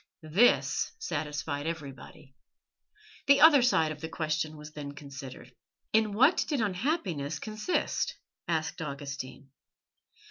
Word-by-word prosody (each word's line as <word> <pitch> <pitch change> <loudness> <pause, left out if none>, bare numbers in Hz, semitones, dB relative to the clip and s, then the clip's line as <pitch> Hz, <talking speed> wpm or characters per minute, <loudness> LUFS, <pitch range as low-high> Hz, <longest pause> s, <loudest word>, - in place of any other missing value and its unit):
This 185 +11 +3
satisfied 150 - -3
everybody. 140 -3 -7 0.9
The 280 0 +7
other 300 -3 +9
side 165 -11 +3
of 150 -1 -8
the 160 - -5
question 155 -1 -2
was 150 0 -10
then 145 -2 -7
considered. 135 -3 -10 0.4
"In 215 -1 +3
what 265 - +4
did 290 -4 0
unhappiness 190 - -1
consist?" 215 - -2 0.3
asked 160 -1 -1
Augustine. 140 -2 -6
155 Hz, 110 wpm, -29 LUFS, 145-215 Hz, 0.9 s, other